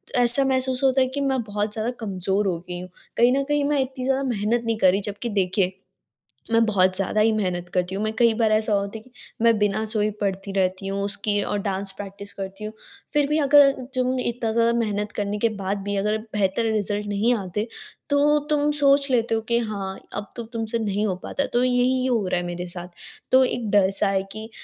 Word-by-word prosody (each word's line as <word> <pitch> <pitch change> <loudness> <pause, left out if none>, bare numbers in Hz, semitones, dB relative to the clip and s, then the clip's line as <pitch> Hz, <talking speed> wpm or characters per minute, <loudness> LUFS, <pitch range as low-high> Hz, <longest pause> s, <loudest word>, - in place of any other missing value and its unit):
ऐसा 245 +2 +4
महसूस 260 0 0
होता 265 0 +4
है 260 - +3
कि 280 +2 -4
मैं 265 -2 +1
बहुत 210 0 -3
ज़्यादा 220 +2 -2
कमज़ोर 195 -1 -1
हो 175 -3 0
गई 175 0 -4
हूँ, 185 - -9 0.3
कहीं 240 +1 +5
न 275 - +1
कहीं 295 -1 +1
मैं 290 -1 +1
इतनी 260 -1 -4
ज़्यादा 270 +1 +1
मेहनत 235 -1 0
नहीं 225 -1 0
कर 185 -3 +5
रही, 200 +2 0
जबकि 205 +4 -4
देखिए, 190 -2 +1 0.8
मैं 230 0 +5
बहुत 185 -3 +3
ज़्यादा 200 +2 +1
ही 225 +1 +4
मेहनत 180 -4 -2
करती 180 +1 0
हूँ। 205 - -2
मैं 215 0 -1
कई 235 -2 +5
बार 220 -1 +1
ऐसा 215 0 +2
होता 200 +2 -1
है - - -11
कि 255 - -21 0.3
मैं 230 -1 +4
बिना 210 +1 +1
सोए 215 -1 +1
पढ़ती 195 0 -2
रहती 190 0 0
हूँ 195 0 -2
उसकी 205 0 0
और 205 - -2
डांस 195 -1 -2
प्रैक्टिस 200 0 -8
करती 195 +1 -7
हूँ। 215 +1 -5 0.4
फिर 295 -1 +3
भी 305 - +2
अगर 285 -1 +6 0.2
तुम 255 0 +1
इतना 235 -2 -2
ज़्यादा 230 +1 +3
मेहनत 210 -1 -1
करने 205 0 -2
के 230 +1 +2
बाद 195 +2 -1
भी 205 0 -2
अगर 210 +2 +1 0.2
बेहतर 210 +3 +1
रिज़ल्ट 210 -1 -1
नहीं 205 +4 +2
आते, 205 +3 -3 0.4
तो 290 +1 +4
तुम 295 0 +2
सोच 280 0 +4
लेते 230 -2 +2
हो 225 - -1
कि 235 - +4
हाँ, 200 -4 -4
अब 205 0 -6
तो 235 - -5
तुमसे 230 0 -3
नहीं 210 -1 -1
हो 185 - -1
पाता, 280 - -2
तो 245 - +3
यही 255 +1 +2
हो 235 -6 +1
रहा 180 - +1
है 175 - -4
मेरे 175 +1 -4
साथ। 175 0 -7 0.4
तो 260 0 +7
एक 240 -3 -1
डर 200 -2 +4
सा 200 - +3
है 190 -1 +1
कि 220 +2 -7
215 Hz, 225 wpm, -24 LUFS, 200-245 Hz, 0.8 s, तो